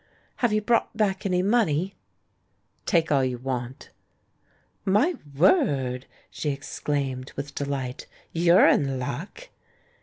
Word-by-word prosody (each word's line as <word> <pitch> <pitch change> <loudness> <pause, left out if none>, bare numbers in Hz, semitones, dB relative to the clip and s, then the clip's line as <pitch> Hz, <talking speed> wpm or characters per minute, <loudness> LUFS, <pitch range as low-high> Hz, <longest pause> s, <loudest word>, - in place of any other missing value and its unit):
"Have 240 -3 +1
you 215 0 +1
brought 230 -1 +1
back 200 -2 0
any 180 -1 +1
money?" 195 -4 +1 0.9
"Take 165 -4 +2
all 140 -2 +4
you 130 -1 -1
want." 125 0 -5 0.9
"My 215 - +3 0.2
word!" 135 - +2 0.2
she 150 - -3
exclaimed, 140 -2 -3
with 140 +1 -6
delight. 140 -2 -4 0.3
"You're 170 +2 +5
in 135 -2 +2
luck!" 170 - -6
150 Hz, 115 wpm, -25 LUFS, 135-195 Hz, 0.9 s, You're